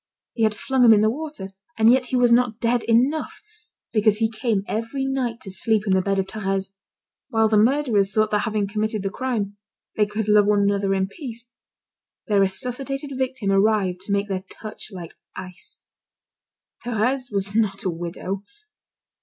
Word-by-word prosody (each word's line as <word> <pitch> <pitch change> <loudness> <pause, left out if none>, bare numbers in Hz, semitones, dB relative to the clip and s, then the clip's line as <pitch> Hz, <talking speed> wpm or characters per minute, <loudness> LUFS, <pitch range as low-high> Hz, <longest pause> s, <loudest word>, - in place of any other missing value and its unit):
He 230 - -5
had 215 -1 +1
flung 260 +4 +1
him 230 -2 +8
in 210 - +4
the 215 +1 +3
water; 295 -7 -6 0.3
and 220 +1 +6
yet 255 -1 +1
he 255 - -2
was 245 -1 +4
not 240 -2 +3
dead 235 0 +1
enough, 255 +7 +1 0.5
because 215 -1 +3
he 225 0 +1
came 220 -3 -1
every 230 +5 -2
night 255 -4 -2
to 195 - -8
sleep 215 +2 +1
in 195 - +2
the 190 - +3
bed 195 +1 0
of 195 - +1
Thérèse. 195 -1 -3 0.6
While 225 -1 +3
the 215 -1 +4
murderers 225 -5 +2
thought 215 +1 +1
that 210 - +2
having 210 -1 0
committed 215 0 -2
the 195 - -2
crime, 215 -5 -3 0.4
they 210 -1 +2
could 210 0 -3
love 210 -1 +5
one 205 -1 +3
another 200 -1 +1
in 190 0 0
peace, 240 - -9 0.8
their 205 -2 +2
resuscitated 270 +8 -2
victim 255 -6 -1
arrived 195 -2 +2
to 195 - -7
make 200 0 +1
their 190 -2 -3
touch 215 0 -9
like 175 -4 -8 0.2
ice. 185 -1 -8 1.0
Thérèse 245 +2 -1
was 200 0 -2
not 215 -3 +1
a 185 - 0
widow. 175 +3 -5
215 Hz, 180 wpm, -23 LUFS, 195-240 Hz, 1.0 s, him